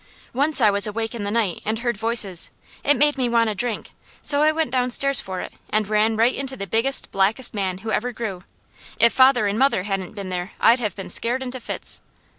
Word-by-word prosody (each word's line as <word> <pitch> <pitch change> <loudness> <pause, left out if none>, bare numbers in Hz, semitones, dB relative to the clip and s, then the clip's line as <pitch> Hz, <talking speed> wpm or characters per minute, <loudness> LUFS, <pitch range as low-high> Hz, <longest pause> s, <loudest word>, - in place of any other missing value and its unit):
Once 285 +4 +3
I 215 -4 +5
was 200 +1 +2
awake 225 +2 -3
in 220 -4 -5
the - - -2
night 210 -5 -1
and 220 +1 -1
heard 240 0 -2
voices. 215 -5 +2 0.3
It 290 0 +3
made 295 -1 +2
me 250 -2 +1
want 230 -2 +2
a - - -3
drink, 225 +2 -4 0.3
so 285 -1 +1
I 305 +1 +4
went 315 -4 -2
downstairs 255 +2 +3
for 185 -1 -6
it, - - -8 0.2
and 215 -1 0
ran 215 +1 +1
right 230 +3 +3
into 270 -1 -4
the 195 - -4
biggest, 230 +8 0
blackest 205 +6 0
man 190 -3 -2
who 220 - -2
ever 245 +3 -1
grew. 215 -6 -6 0.6
If 235 +1 +5
father 260 -3 +4
and 205 +2 -1
mother 270 -8 +2
hadn't 195 0 -4
been 200 -2 -6
there 180 +1 -5
I'd 235 +2 +4
have 215 -6 -3
been 195 - -8
scared 245 +3 -1
into 255 0 -6
fits. - - -3
225 Hz, 225 wpm, -22 LUFS, 205-255 Hz, 0.6 s, I